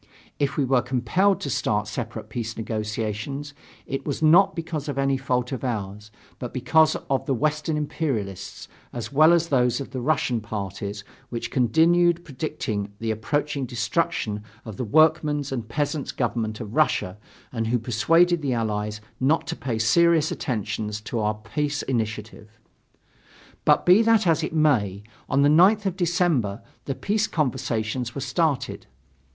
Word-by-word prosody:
If 140 -1 0
we 140 - +2
were 130 -1 +3
compelled 135 +11 +1
to 140 - -3
start 105 -2 0
separate 110 0 -5
peace 115 0 -5
negotiations, 110 +5 -4 0.3
it 135 - -4
was 145 - -3
not 170 +6 +6
because 160 -3 -4
of 140 - -4
any 135 0 +2
fault 125 -1 -1
of 130 - -4
ours, 105 -3 -4 0.3
but 125 0 -6
because 155 +5 +4
of 135 -1 -1
the 135 - +1
Western 155 +3 0
imperialists, 130 - -3 0.3
as 120 +3 -6
well 155 +4 +6
as 170 -1 +3
those 125 -2 +2
of 135 - -7
the 130 -1 -4
Russian 125 -4 +1
parties, 100 -1 -5 0.3
which 120 -1 -4
continued 170 +7 +3
predicting 125 -8 -4
the 110 +1 -2
approaching 140 +5 -2
destruction 115 -2 -1 0.2
of 110 -4 -8
the - - -2
workmen's 150 +2 +3
and 120 -4 -4
peasants' 145 +1 -2
government 110 -3 -2
of 110 -3 -7
Russia 90 +3 +1 0.3
and 115 -2 -2
who 120 +2 +2
persuaded 160 +10 +3
the 135 -3 0
Allies 105 -2 -2 0.2
not 145 +5 +2
to - - -4
pay 120 -4 -3
serious 160 +8 +3
attention 110 -4 -3
to 105 +2 -4
our 105 0 0
peace 145 +7 -3
initiative. 110 -3 -3 1.2
But - - +4
be 180 +5 +7
that 225 -2 +4
as 165 -2 +2
it - - -2
may, 120 - +1 0.3
on 140 +1 +3
the - - +5
9th 190 +7 +5
of 190 -2 0
December 165 - 0 0.2
the 135 - -3
peace 215 +6 0
conversations 125 - -2
were 140 - -3
started. 130 - -1
130 Hz, 155 wpm, -24 LUFS, 110-155 Hz, 1.2 s, be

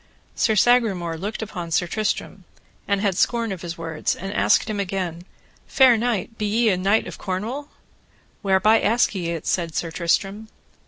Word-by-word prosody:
Sir 220 - +1
Sagramore 200 -7 +2
looked 205 +6 -4
upon 180 -5 -6
Sir 165 +2 +1
Tristram, 215 +4 -3 0.4
and 200 -1 +1
had 200 -3 +1
scorn 230 +2 +1
of 185 -3 -5
his 170 -1 -6
words, 165 -2 -2
and 195 +2 -6
asked - - +3
him 215 -2 -3
again, 180 -3 -3 0.4
Fair 260 -4 +5
knight, 225 -2 -2
be 210 - 0
ye 225 +2 +2
a 190 - +3
knight 195 +4 +2
of - - -9
Cornwall? 225 +10 -4 0.7
Whereby 205 +3 +3
ask 230 +3 +2
ye 175 -4 -3
it? 165 -2 -4
said 170 -3 -1
Sir 165 - -2
Tristram. 195 +6 -1
195 Hz, 170 wpm, -23 LUFS, 175-220 Hz, 0.7 s, Fair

